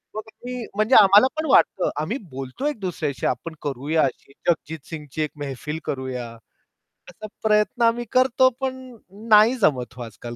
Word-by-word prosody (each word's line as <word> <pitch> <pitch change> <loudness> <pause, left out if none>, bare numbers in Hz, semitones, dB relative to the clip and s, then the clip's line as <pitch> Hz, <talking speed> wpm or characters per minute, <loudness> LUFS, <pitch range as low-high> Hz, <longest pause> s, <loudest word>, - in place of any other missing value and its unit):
मग 215 - -3 0.2
मी 250 -1 -5
म्हणजे 215 +5 +2
आम्हाला 205 +3 +7
पण 315 - -1
वाटतं 190 - +3
आम्ही 210 - -2
बोलतो 135 - -5
एक 295 -6 -3
दुसऱ्याशी 155 -8 -3
आपण 160 +7 -3
करूया 145 +3 0
अशी 135 +1 -4 0.2
जगजीत 160 -1 -1
सिंगची 155 -2 -6
एक 150 - -4
मेहफिल 145 +2 -5
करूया. 130 -3 -4 0.8
असा 215 - -10 0.2
प्रयत्न 210 +2 +2
आम्ही 235 +1 +2
करतो, 260 0 +4
पण 260 -1 -1 0.5
नाही 215 +3 +6
जमत 130 - +1
हो 125 - -9
आजकाल 120 +1 -9
165 Hz, 155 wpm, -23 LUFS, 135-230 Hz, 0.8 s, आम्हाला